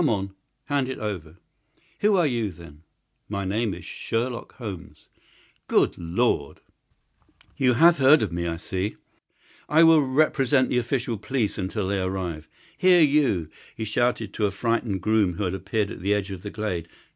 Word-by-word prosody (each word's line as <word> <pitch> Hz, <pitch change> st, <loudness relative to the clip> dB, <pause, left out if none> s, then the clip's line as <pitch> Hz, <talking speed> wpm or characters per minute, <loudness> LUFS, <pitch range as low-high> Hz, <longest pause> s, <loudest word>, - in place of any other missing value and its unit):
Come, 100 Hz, -8 st, -1 dB, 0.3 s
hand 140 Hz, -2 st, 0 dB
it 130 Hz, -, -4 dB
over!" 90 Hz, -6 st, -5 dB, 0.6 s
"Who 210 Hz, 0 st, +3 dB
are 175 Hz, -3 st, +3 dB
you, 120 Hz, -6 st, 0 dB
then?" 80 Hz, -3 st, -14 dB, 0.5 s
"My 100 Hz, -1 st, -3 dB
name 105 Hz, 0 st, -1 dB
is 90 Hz, -, -11 dB
Sherlock 120 Hz, +1 st, -4 dB
Holmes." 90 Hz, -, -9 dB, 0.6 s
"Good -, -, +2 dB
Lord!" 85 Hz, -, -1 dB, 1.0 s
"You 125 Hz, -2 st, +3 dB
have 165 Hz, +5 st, +5 dB
heard 140 Hz, +2 st, +6 dB
of 100 Hz, -, -2 dB
me, 85 Hz, 0 st, -2 dB
I 85 Hz, -1 st, -3 dB
see. 95 Hz, +4 st, -3 dB, 0.7 s
I 160 Hz, +2 st, +6 dB
will 165 Hz, -2 st, +7 dB
represent 135 Hz, -1 st, +2 dB
the 125 Hz, -, +2 dB
official 120 Hz, -2 st, -2 dB
police 110 Hz, -2 st, -2 dB
until 95 Hz, +1 st, -2 dB
their 100 Hz, -2 st, 0 dB
arrival. 85 Hz, -5 st, -4 dB, 0.3 s
Here, 180 Hz, -1 st, +5 dB
you!" 140 Hz, -, +2 dB, 0.2 s
he 110 Hz, -, -4 dB
shouted 110 Hz, -1 st, 0 dB
to 105 Hz, -, +1 dB
a -, -, -1 dB
frightened 115 Hz, -1 st, -1 dB
groom 105 Hz, -3 st, +2 dB
who 105 Hz, -, -3 dB
had 90 Hz, -1 st, -1 dB
appeared 100 Hz, +3 st, -2 dB
at -, -, -8 dB
the 100 Hz, +3 st, +2 dB
edge 100 Hz, -1 st, -3 dB
of 95 Hz, -2 st, -7 dB
the 105 Hz, -, -6 dB
glade. 100 Hz, -6 st, -4 dB
105 Hz, 170 wpm, -25 LUFS, 95-130 Hz, 1.0 s, will